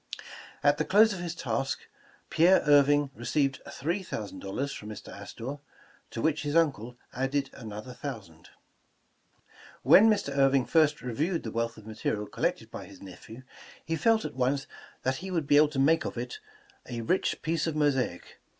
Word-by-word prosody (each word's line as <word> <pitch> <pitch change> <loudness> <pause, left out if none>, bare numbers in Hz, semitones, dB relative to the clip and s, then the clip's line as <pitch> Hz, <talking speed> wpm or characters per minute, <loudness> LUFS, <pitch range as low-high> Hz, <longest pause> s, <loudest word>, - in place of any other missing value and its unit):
At 145 +1 +4
the - - +2
close 210 +5 +5
of 185 - -6
his 175 -1 -4
task, 135 -2 -2 0.5
Pierre 175 +4 +5
Irving 145 -1 +4
received 135 +2 -1
three 170 +7 -2
thousand 105 - -6
dollars 135 +10 -3
from 105 - -8
Mr. 105 -1 -9
Astor, 115 +7 -7 0.5
to 115 - -5
which 155 -1 +1
his 145 +1 -3
uncle 135 -8 +1 0.2
added 135 +2 -1
another 110 +1 -8
thousand. 105 - -8 1.3
When 220 +3 +7
Mr. 200 -10 0
Irving 135 -2 +4
first 150 -5 +2
reviewed 155 +9 -1
the 110 - -5
wealth 115 +1 -2
of 110 - -13
material 110 -1 -3
collected - - -2
by - - -7
his - - -14
nephew, 100 +6 -11 0.4
he 165 - -1
felt 220 +7 +2
at - - -5
once 135 +2 0 0.4
that 130 +1 0
he 190 +4 -7
would 170 -5 -1
be 145 +1 +4
able 150 +1 +7
to 150 - -7
make 155 +5 +4
of - - -5
it 430 - -5 0.5
''a 115 -2 -5
rich 185 - +1
piece 165 0 0
of 160 - -2
mosaic." 135 -11 -1
140 Hz, 170 wpm, -28 LUFS, 115-160 Hz, 1.3 s, When